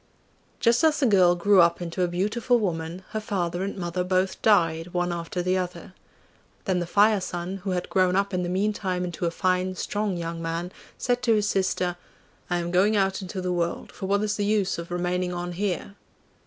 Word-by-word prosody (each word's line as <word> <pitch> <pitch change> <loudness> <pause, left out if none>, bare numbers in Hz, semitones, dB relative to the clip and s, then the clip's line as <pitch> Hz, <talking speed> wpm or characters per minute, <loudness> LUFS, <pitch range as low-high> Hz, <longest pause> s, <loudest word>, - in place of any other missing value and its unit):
Just 235 +6 +3
as 315 -1 +4
the 280 - +3
girl 185 -6 +5
grew 190 +2 +5
up 170 0 +3
into 175 +1 -4
a 180 - +3
beautiful 210 +8 +1
woman, 175 -3 -3
her 215 - -2
father 180 -5 -2
and 200 +1 -4
mother 180 0 -2
both 185 +1 0
died 170 -4 +2
one 175 0 +1
after 170 +1 -3
the 185 +1 +1
other. 180 0 -6 0.7
Then 185 -3 +1
the 175 - -3
Fire 205 +2 +4
son, 180 +1 -4
who 195 +1 -6
had 180 -1 -1
grown 185 -1 +2
up 200 0 +1
in 180 - 0
the 175 - -2
meantime 190 -1 -1
into 175 -1 -2
a - - +2
fine, 185 +1 0
strong 205 -1 -2
young 165 0 -4
man, 165 +2 -3 0.3
said 245 0 0
to 235 -3 +3
his 210 -1 +1
sister, 185 -2 0 0.5
'I 175 - +1
am 175 0 -3
going 200 +4 +3
out 195 0 +1
into 190 0 -5
the 180 0 -1
world, 170 -1 -2
for 190 - -6
what 200 +1 +2
is 210 0 -1
the 205 - 0
use 205 -4 +1
of 170 - -7
remaining 180 +1 -1
on 175 0 -4
here? 195 +1 -3
185 Hz, 210 wpm, -25 LUFS, 175-200 Hz, 0.7 s, girl